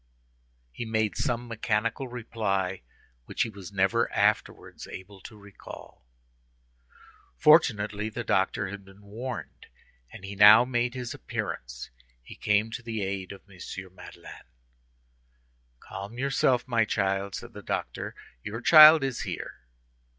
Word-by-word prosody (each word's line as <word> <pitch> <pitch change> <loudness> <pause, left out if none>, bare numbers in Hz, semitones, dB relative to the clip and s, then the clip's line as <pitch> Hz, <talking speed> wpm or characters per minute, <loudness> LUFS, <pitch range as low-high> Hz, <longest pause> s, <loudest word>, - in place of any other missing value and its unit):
He 120 - -6
made 110 -2 -1
some 120 0 -2
mechanical 115 +2 -2
reply 105 -6 -3 0.4
which - - -1
he 115 - -5
was 100 -2 -10
never 100 +4 +1
afterwards - - -1
able 95 +1 -11
to 110 - -12
recall. 100 -10 -13 1.3
Fortunately, 105 -9 +3
the 120 +2 -5
doctor 95 -1 0
had 100 0 -8
been 95 +1 -18
warned, 115 +4 -7 0.4
and - - -12
he 100 +1 -7
now 105 +4 +8
made 120 0 -1
his 125 -2 -5
appearance. - - -6 0.3
He - - -11
came 105 +2 +1
to 120 - -6
the 115 -3 -4
aid 95 -1 -4
of 100 - -11
M. 95 -2 -17 0.3
Madeleine. - - -13 1.3
"Calm 100 +5 -9
yourself, 130 -1 +1
my 115 -2 +2
child," 95 -2 -1
said - - -9
the - - -9
doctor; - - -4 0.3
"your 110 - -6
child 155 +2 +9
is 135 -3 -2
here." - - -6
105 Hz, 130 wpm, -27 LUFS, 100-120 Hz, 1.3 s, child